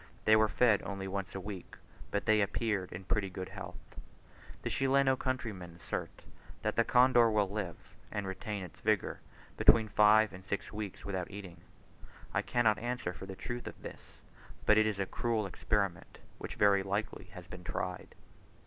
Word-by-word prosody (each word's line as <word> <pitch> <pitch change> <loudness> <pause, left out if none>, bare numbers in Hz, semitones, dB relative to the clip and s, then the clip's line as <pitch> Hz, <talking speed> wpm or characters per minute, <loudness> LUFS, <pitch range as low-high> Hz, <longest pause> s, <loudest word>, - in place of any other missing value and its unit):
They 110 - +7
were 110 0 +5
fed 110 -2 +4
only 95 -1 -5
once 95 -1 -4
a - - -2
week, 95 -1 -7 0.3
but - - -1
they 110 -1 +4
appeared 100 -2 0
in 85 +2 -7
pretty 95 +1 0
good 95 0 -6
health. - - -7 0.9
The - - -1
Chileno 135 0 +3
countrymen 110 -10 -4
assert 85 - -5 0.4
that - - 0
the 115 - +4
condor 125 -1 +5
will 105 -2 +2
live, 95 -4 -3 0.4
and 100 -1 -2
retain 100 +1 -4
its 90 - -11
vigour, - - +1 0.4
between 110 -1 +6
five 105 0 +5
and 95 0 -10
six 100 +1 -4
weeks 105 -2 -6
without 95 -3 -3
eating: 95 -4 -9 0.7
I - - +2
cannot 110 -5 +2
answer 120 -6 -2
for 95 - -9
the 95 - -6
truth 120 +5 -5
of - - -8
this, - - -11 0.4
but 105 - +6
it 110 0 +5
is 105 -2 -1
a 95 - 0
cruel 115 +2 -1
experiment, 100 -1 -1 0.2
which - - -6
very 100 -1 +5
likely 100 +3 -3
has 90 -1 -9
been 90 0 -10
tried. 90 +1 -4
100 Hz, 175 wpm, -33 LUFS, 95-110 Hz, 0.9 s, They